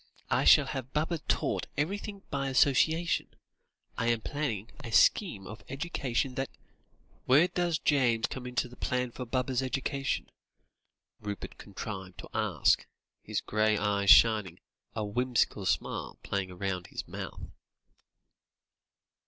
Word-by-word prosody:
I - - +2
shall - - +8
have 130 -1 -5
Baba 160 +2 0
taught - - -1
everything 200 +6 -3
by 135 -1 -1
association. 160 +6 +3 0.7
I 115 - 0
am 120 -1 +2
planning 120 -7 -3
a 115 - -6
scheme 110 - +3
of 105 - -9
education 135 -3 -2
that 135 0 -2 0.4
" - - -35
"Where 145 +7 +6
does 175 -3 0
James 125 -5 +2
come 125 -1 -5
in 125 - -8
to 125 - +1
the 125 - -14
plan 125 -1 -1
for 125 +1 -7
Baba's 130 +1 0
education?" 135 +1 -2 0.9
Rupert 105 -1 -6
contrived 95 -2 -7
to - - -9
ask, - - +2 0.3
his - - -3
grey 110 0 +1
eyes 100 -1 +1
shining, 105 -6 +6 0.4
a 110 -2 -1
whimsical 125 +4 0
smile - - -1
playing 95 -2 -3
round 90 -2 -3
his - - -6
mouth. - - -7
125 Hz, 135 wpm, -30 LUFS, 110-140 Hz, 0.9 s, shall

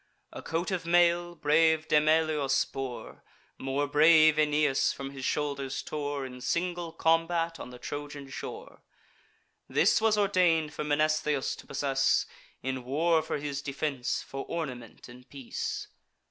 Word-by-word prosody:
A - - -7
coat 165 +4 -2
of 185 -2 -2
mail, 175 0 +3
brave 160 +1 +3
Demoleus 155 -2 +2
bore, 130 -3 -7 0.4
More 135 +2 -1
brave 155 +1 +6
Aeneas 150 -2 +2
from 135 0 -7
his 135 -1 -8
shoulders 140 -2 -2
tore, 145 -2 -3
In 125 -1 -9
single 175 +4 -2
combat 165 +1 +1
on - - -7
the 125 - -10
Trojan 145 +2 -7
shore: 440 - -8 0.9
This - - +3
was 220 -1 +3
ordain'd 175 -6 +2
for - - -4
Mnestheus 150 -1 +1
to - - -13
possess; 135 -1 +1 0.4
In 130 0 -3
war 160 +6 +2
for - - -3
his 140 -1 -4
defence, 140 -2 -2
for 135 0 -6
ornament 130 -9 -6
in 125 +1 -13
peace. 135 -3 -5
150 Hz, 135 wpm, -29 LUFS, 135-165 Hz, 0.9 s, brave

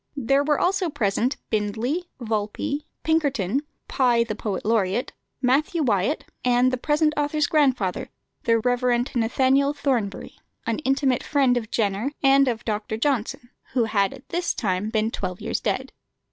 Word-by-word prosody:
There 275 +2 +2
were 295 0 +1
also 370 -1 +1
present 235 0 0
Bindley, 225 - -1
Valpy, 225 +5 -2 0.2
Pinkerton, 280 - +1 0.3
Pye 245 -3 +3
the 230 - -4
poet 205 -3 -4
laureate, 215 0 +1 0.3
Matthew 300 +6 +2
Wyatt, 220 +4 +1 0.2
and 250 +1 +3
the - - +1
present 305 +3 +1
author's 295 0 +1
grandfather, 260 - +1 0.4
the 230 0 +4
Rev. 245 +2 0 0.3
Nathaniel 265 +4 +2
Thornbury, 245 -9 -2 0.3
an 230 -1 -1
intimate 270 -3 +1
friend 270 -4 +2
of 225 -3 -2
Jenner 210 +4 0
and 275 0 +5
of 230 -3 -2
Dr. 215 0 -2
Johnson, 245 -1 -1 0.2
who 245 - +3
had 200 -3 +1
at 270 -1 -13
this 350 0 -1
time 200 -1 -1
been 220 0 0
twelve 185 -4 -4
years - - -2
dead. - - -2
245 Hz, 145 wpm, -24 LUFS, 220-280 Hz, 0.4 s, and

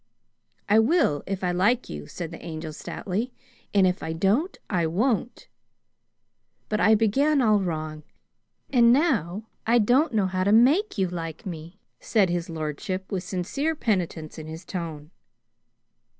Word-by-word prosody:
"I 210 +2 +5
will 225 - +3
if 195 -1 -3
I 180 - +1
like 205 +8 +2
you," 75 -1 -7
said 165 - -6
the 165 - -10
Angel 160 -1 -6
stoutly, 205 +9 -4 0.4
"and 195 -2 +4
if 180 0 0
I 160 - -3
don't, 210 - +1
I 175 -5 0
won't!" 225 +7 -1 1.2
"But 215 - 0
I 220 +1 +5
began 275 +8 +2
all 215 -5 +4
wrong, 155 -4 -3 0.7
and 235 -3 +6
now 225 - +1 0.2
I 235 +1 +5
don't 250 +8 +3
know 205 -3 +3
how 185 0 -1
to 200 - +2
make 275 - +4
you 190 -1 +2
like 165 -2 -6
me," 170 0 -7 0.2
said 200 -6 +2
his 175 -1 -2
lordship, 165 +4 -4
with 185 -3 -2
sincere 200 - -2
penitence 175 - -2
in 155 - -8
his 160 +2 -8
tone. 160 -4 -6
190 Hz, 150 wpm, -25 LUFS, 165-230 Hz, 1.2 s, and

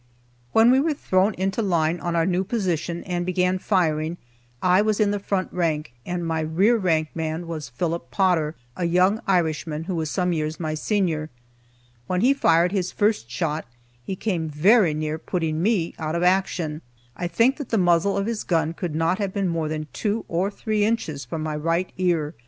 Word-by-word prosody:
When 225 +2 +6
we 260 - +5
were 305 +1 +1
thrown 190 -5 +1
into 195 +4 -1
line 170 -4 +1
on 170 -1 -2
our 165 -1 +2
new 185 +1 +1
position 180 -5 -2
and 175 -1 -2
began 180 +1 +1
firing, 165 -4 0 0.4
I 180 +5 +4
was 215 -1 +1
in 210 -1 +3
the 205 - -1
front 195 -1 -2
rank, 155 -7 -1
and 175 -1 -2
my 165 -1 -1
rear 170 +9 +3
rank 165 -7 +1
man 160 +1 -3
was 155 -5 -5
Philip 160 +2 -3
Potter, 160 0 +1 0.2
a 175 - -2
young 185 +5 +3
Irishman, 160 -4 0
who 185 +3 -4
was 160 -3 -2
some 180 0 0
years 155 -1 -2
my 155 -2 -2
senior. 160 -2 -1 0.8
When 180 0 0
he 260 +5 +5
fired 170 -9 +3
his 185 -3 -1
first 205 - 0
shot, 150 +4 -2 0.4
he 190 - -4
came 175 -6 -2
very 170 +3 +4
near 155 +1 -2
putting 160 -2 -2
me 190 -4 +1
out 155 0 -2
of 170 - 0
action. 180 -4 +1 0.3
I 175 - -3
think 230 +10 +2
that 290 - -6
the 225 - +1
muzzle 175 +1 +3
of 200 - 0
his 230 -1 -2
gun 165 -2 0
could 170 -2 -4
not 165 +4 +1
have 200 -2 -2
been 195 -2 0
more 165 -2 -1
than 155 0 -3
two 215 +1 -2
or 180 +4 0
three 215 0 -1
inches 160 - -1
from 155 +5 -4
my 155 -1 -2
right 165 +4 -1
ear. 170 -4 +1
175 Hz, 195 wpm, -24 LUFS, 160-195 Hz, 0.8 s, When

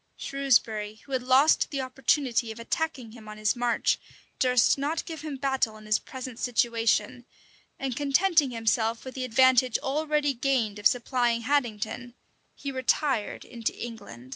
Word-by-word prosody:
Shrewsbury, 225 -6 0
who 275 - -15
had 260 -1 0
lost 260 +5 +4
the 275 -2 -3
opportunity 255 -2 0
of 220 - -9
attacking 255 -1 -3
him 220 -2 -12
on 215 - -9
his 215 +3 +1
march, 240 -1 +1 0.4
durst 250 -2 +4
not 300 +4 -2
give 320 -3 -7
him 300 -3 -5
battle 265 -5 0
in 215 - -14
his 215 0 +2
present 255 -2 -8
situation; 230 -1 0 0.5
and 265 -3 -3
contenting 295 +2 +3
himself 225 0 0
with 260 - -7
the 260 - -4
advantage 255 0 +4
already 295 0 0
gained 240 -5 0
of 205 - +6
supplying 240 -1 0
Haddington, 240 -2 -2 0.4
he 280 - -5
retired 260 -2 -1
into 235 -2 -4
England. 130 - -9
250 Hz, 150 wpm, -27 LUFS, 225-275 Hz, 0.5 s, of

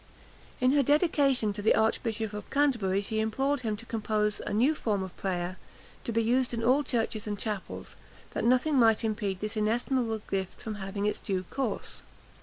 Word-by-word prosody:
In 255 0 +4
her 285 0 +4
dedication 280 - +3
to 205 - -5
the 220 - +4
Archbishop 220 -1 0
of 210 -1 -7
Canterbury 235 -10 +2
she 220 +2 -2
implored 270 +6 0
him 215 -3 -2
to 230 - -9
compose 215 -2 -1
a - - -2
new 245 +9 +3
form 210 -9 -1
of 190 -1 -8
prayer, 180 -1 -2 0.5
to - - -1
be 230 0 +2
used 245 +1 +1
in 230 - -3
all 255 +5 +4
churches 225 -4 -1
and 205 -1 -2
chapels, 210 -2 -5 0.4
that - - -2
nothing 255 +5 +3
might 225 -2 +5
impede 210 -4 -2
this 215 +1 -1
inestimable 225 +1 0
gift 190 -1 -2
from 220 - -5
having 195 +1 -3
its 210 - 0
due 190 -2 -2
course. 275 - -3
220 Hz, 185 wpm, -29 LUFS, 205-250 Hz, 0.5 s, might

